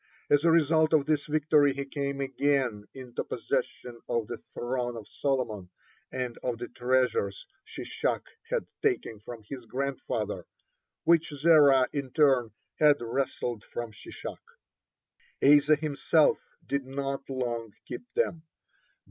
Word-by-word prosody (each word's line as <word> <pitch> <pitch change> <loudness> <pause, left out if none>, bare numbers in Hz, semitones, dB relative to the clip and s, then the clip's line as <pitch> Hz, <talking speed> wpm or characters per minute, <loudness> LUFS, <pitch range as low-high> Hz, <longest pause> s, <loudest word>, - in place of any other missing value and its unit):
As 145 0 +5
a 170 - +5
result 160 -1 +4
of 150 -3 +4
this 155 -1 0
victory 150 -2 +3
he 140 0 -3
came 140 0 -3
again 135 -5 0
into 130 -2 -5
possession 120 -2 -3
of 115 -2 0
the 120 - -6
throne 120 -1 -2
of 110 - -9
Solomon 120 -9 -2 0.4
and 125 -2 -4
of 125 -2 -2
the 120 +1 -6
treasures 130 - 0 0.2
Shishak - - -3 0.2
had 485 -1 0 0.2
taken 370 - 0
from 115 +1 -9
his 130 -1 -7
grandfather, 140 +1 -3 0.6
which 165 -1 +4
Zerah 145 -3 +5
in 140 -3 -3
turn 135 -5 +3 0.3
had 150 -2 +6
wrested 120 -2 -2
form 120 -1 -6
Shishak. 105 - -8 1.0
(19) 145 +2 +7
Asa 150 +2 +4
himself 155 +1 +2 0.3
did 140 0 -1
not 135 0 -4
long 120 -4 -3
keep 245 - -8
them. 420 - 0
135 Hz, 130 wpm, -29 LUFS, 120-150 Hz, 1.0 s, 19